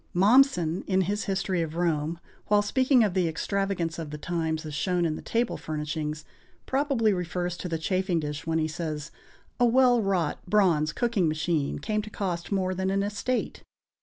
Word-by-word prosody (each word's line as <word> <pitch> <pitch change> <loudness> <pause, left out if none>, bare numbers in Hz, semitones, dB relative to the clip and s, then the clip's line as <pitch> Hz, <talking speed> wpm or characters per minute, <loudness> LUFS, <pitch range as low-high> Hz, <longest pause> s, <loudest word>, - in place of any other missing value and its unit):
Mommsen, 195 - +4
in 190 -1 +2
his 205 +4 -1
history 190 -2 0
of 160 -1 -4
Rome, 165 -1 0 0.3
while 205 0 +4
speaking 255 +3 +3
of 205 -4 +1
the 180 -2 +2
extravagance 175 0 -2
of 160 -2 -5
the 150 - -6
times, 160 0 -2
as 155 - -6
shown 180 +3 0
in 155 -2 0
the - - -7
table 235 +1 -1
furnishings, 150 0 -4 0.4
probably 265 -6 +1
refers 180 -1 -2
to 180 - -5
the 165 - -1
chafing 185 +1 0
dish 150 0 -5
when 165 0 +1
he 155 -1 +1
says: 160 -1 -5 0.5
"A 245 - +5
well 245 0 +4
wrought 185 -6 0
bronze 175 -7 +3
cooking 225 -2 +1
machine 155 -2 0
came 210 +8 -1
to 215 - -9
cost 180 -4 -3
more 185 -2 0
than 190 +1 -1
an 195 +1 +1
estate." 210 +5 -2
180 Hz, 180 wpm, -27 LUFS, 160-205 Hz, 0.5 s, A